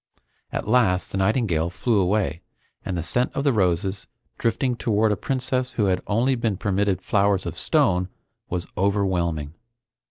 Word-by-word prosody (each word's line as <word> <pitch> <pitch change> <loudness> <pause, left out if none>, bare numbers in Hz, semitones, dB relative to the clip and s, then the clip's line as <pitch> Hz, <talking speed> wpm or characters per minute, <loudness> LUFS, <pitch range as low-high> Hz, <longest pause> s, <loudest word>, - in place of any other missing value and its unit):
At - - -3
last 105 -6 +2
the 95 - -2
nightingale 95 -6 +1
flew 105 +5 0
away, 95 -3 0 0.4
and 90 - -3
the 85 - -2
scent 125 +9 0
of 140 - -1
the 140 -2 +3
roses, 95 0 0 0.3
drifting 125 +2 0
toward 110 -2 +1
a - - +2
princess 130 +1 -1
who 105 - +1
had 90 -2 +1
only 120 +6 +2
been 115 -5 -1
permitted 100 -2 0
flowers 100 -2 +2
of - - -4
stone, 90 +1 +1 0.4
was 90 0 -2
overwhelming. 90 -6 0
100 Hz, 155 wpm, -24 LUFS, 90-115 Hz, 0.4 s, the